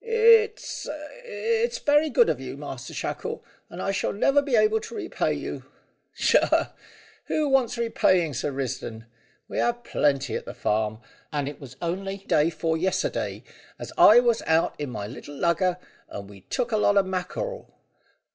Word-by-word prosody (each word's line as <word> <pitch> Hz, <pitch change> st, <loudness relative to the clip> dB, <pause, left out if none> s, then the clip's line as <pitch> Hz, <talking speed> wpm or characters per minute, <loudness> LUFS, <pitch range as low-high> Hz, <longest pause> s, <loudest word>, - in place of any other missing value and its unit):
"It's 455 Hz, -1 st, +3 dB, 0.4 s
it's 465 Hz, 0 st, -1 dB
very 295 Hz, +1 st, +3 dB
good 475 Hz, +8 st, +4 dB
of -, -, 0 dB
you, -, -, -7 dB
Master -, -, -7 dB
Shackle, -, -, -4 dB, 0.3 s
and -, -, -9 dB
I 195 Hz, -, -1 dB
shall 195 Hz, -, -1 dB
never 275 Hz, +8 st, +3 dB
be 275 Hz, -3 st, 0 dB
able 215 Hz, 0 st, +4 dB
to 455 Hz, -, -9 dB
repay 420 Hz, -, -1 dB
you." -, -, -4 dB, 0.5 s
"Tchah! -, -, +3 dB, 0.5 s
Who 310 Hz, -1 st, 0 dB
wants 260 Hz, -3 st, +2 dB
repaying, 185 Hz, -8 st, +2 dB
Sir 140 Hz, +4 st, -2 dB
Risdon? 130 Hz, -4 st, -4 dB, 0.4 s
We -, -, -3 dB
have 240 Hz, 0 st, 0 dB
plenty 140 Hz, -, 0 dB
at -, -, -4 dB
the -, -, -8 dB
farm, 110 Hz, +1 st, -1 dB, 0.3 s
and 145 Hz, -2 st, -1 dB
it 145 Hz, -, -7 dB
was 135 Hz, -2 st, -10 dB
on'y 195 Hz, +3 st, -3 dB
day 150 Hz, +2 st, +3 dB
'fore 165 Hz, -1 st, -1 dB
yes'day 185 Hz, +2 st, -1 dB, 0.3 s
as -, -, -8 dB
I 225 Hz, +3 st, +8 dB
was 240 Hz, -2 st, +2 dB
out 160 Hz, +1 st, +3 dB
in 145 Hz, -2 st, -3 dB
my 105 Hz, -4 st, -5 dB
little 135 Hz, +6 st, -9 dB
lugger, 175 Hz, +4 st, +1 dB, 0.3 s
and 100 Hz, -1 st, -7 dB
we'd 100 Hz, -1 st, -15 dB
took 245 Hz, -2 st, -1 dB
a 215 Hz, -, +2 dB
lot 205 Hz, -1 st, +3 dB
o' 200 Hz, -, +6 dB
mackrel! 190 Hz, -, -4 dB
195 Hz, 165 wpm, -25 LUFS, -, 0.5 s, I